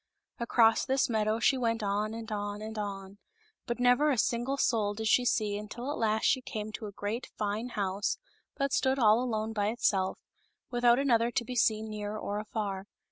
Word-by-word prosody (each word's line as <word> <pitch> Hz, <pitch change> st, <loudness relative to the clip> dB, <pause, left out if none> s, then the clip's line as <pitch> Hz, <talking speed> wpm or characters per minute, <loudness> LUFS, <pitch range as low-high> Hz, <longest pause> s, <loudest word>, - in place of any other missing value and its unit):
Across 230 Hz, -1 st, +4 dB
this 265 Hz, -1 st, +1 dB
meadow 215 Hz, 0 st, +1 dB
she 260 Hz, +3 st, +3 dB
went 230 Hz, -2 st, 0 dB
on 210 Hz, +2 st, -1 dB
and 225 Hz, -1 st, -7 dB
on 205 Hz, 0 st, -3 dB
and 220 Hz, +1 st, -6 dB
on; 195 Hz, -1 st, -6 dB, 0.5 s
but 240 Hz, 0 st, -2 dB
never 250 Hz, +4 st, +4 dB
a 270 Hz, -, +1 dB
single 240 Hz, +5 st, 0 dB
soul 215 Hz, -6 st, +1 dB
did 220 Hz, +1 st, -4 dB
she 245 Hz, +3 st, +4 dB
see 210 Hz, -4 st, +1 dB
until 230 Hz, +6 st, -5 dB
at -, -, -4 dB
last 220 Hz, -1 st, +1 dB
she 260 Hz, -, +3 dB
came 215 Hz, -3 st, -5 dB
to 215 Hz, 0 st, -6 dB
a -, -, -7 dB
great, 205 Hz, +5 st, -4 dB
fine 210 Hz, +3 st, -2 dB
house 200 Hz, -2 st, -1 dB, 0.4 s
that 275 Hz, -1 st, 0 dB
stood 265 Hz, 0 st, +2 dB
ail 225 Hz, -2 st, +5 dB
alone 220 Hz, -3 st, -2 dB
by 205 Hz, -2 st, 0 dB
itself, 200 Hz, -4 st, +1 dB, 0.5 s
without 240 Hz, -1 st, +4 dB
another 240 Hz, -4 st, +3 dB
to 240 Hz, 0 st, -1 dB
be 250 Hz, -, -5 dB
seen, 220 Hz, -2 st, +2 dB
near 210 Hz, 0 st, -4 dB
or 205 Hz, -1 st, -3 dB
afar. 205 Hz, -3 st, -4 dB
220 Hz, 190 wpm, -30 LUFS, 210-240 Hz, 0.5 s, ail